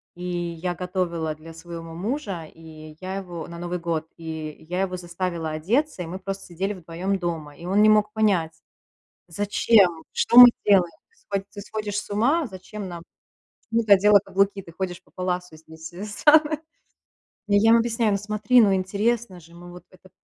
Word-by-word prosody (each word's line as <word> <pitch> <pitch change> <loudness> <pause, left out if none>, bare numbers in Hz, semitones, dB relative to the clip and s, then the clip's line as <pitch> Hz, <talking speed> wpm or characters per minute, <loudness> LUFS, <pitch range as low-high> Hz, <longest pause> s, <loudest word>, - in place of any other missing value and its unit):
и 175 - -10
я 175 0 -3
готовила 170 -3 -3
для 165 +1 -12
своего 165 0 -9
мужа, 195 - -4
и 155 -1 -13
я 190 +1 -5
его 175 -4 -7
на 170 0 -9
Новый 175 0 -4
год, 165 -2 -3
и 160 -1 -7
я 180 +2 -1
его 185 -1 -2
заставила 170 -2 -4
одеться, 210 - -1
и - - -7
мы 185 +3 -6
просто 195 0 -6
сидели 190 +4 -3
вдвоем 185 +2 -3
дома, 160 -4 -4
и 170 - -11
он 195 +3 +2
не 215 - +6
мог 210 0 +3
понять, 190 -7 +1 0.7
зачем, 195 -1 +2
что 235 - 0
мы 245 0 +13 0.2
делаем, 185 -4 +4 0.2
ты 460 - -34
схо 200 - -4
ты 205 - -9
сходишь 210 -1 -5
с 205 - -6
ума, 265 +10 +2
зачем 195 0 -8
нам 170 -1 -8 0.7
почему 230 0 +1
ты 210 - -3
надела 205 +1 +6
каблуки, 195 0 0
ты 170 - -14
ходишь 180 0 -5
по - - -28
паласу 180 -2 -3
здесь, 160 +1 -12
это 195 +4 -6
самое. 300 +8 +4 0.9
Я 205 +2 +4
им 230 - +7
объясняю: 230 -2 +1
"Ну, - - +1
смотри, 215 +4 +3
ну, 200 -3 +4
интересно 200 +1 -1
же, 170 +1 -18
мы 175 0 -12
вот 180 - -12
это 185 0 -19
185 Hz, 185 wpm, -24 LUFS, 170-205 Hz, 0.9 s, мы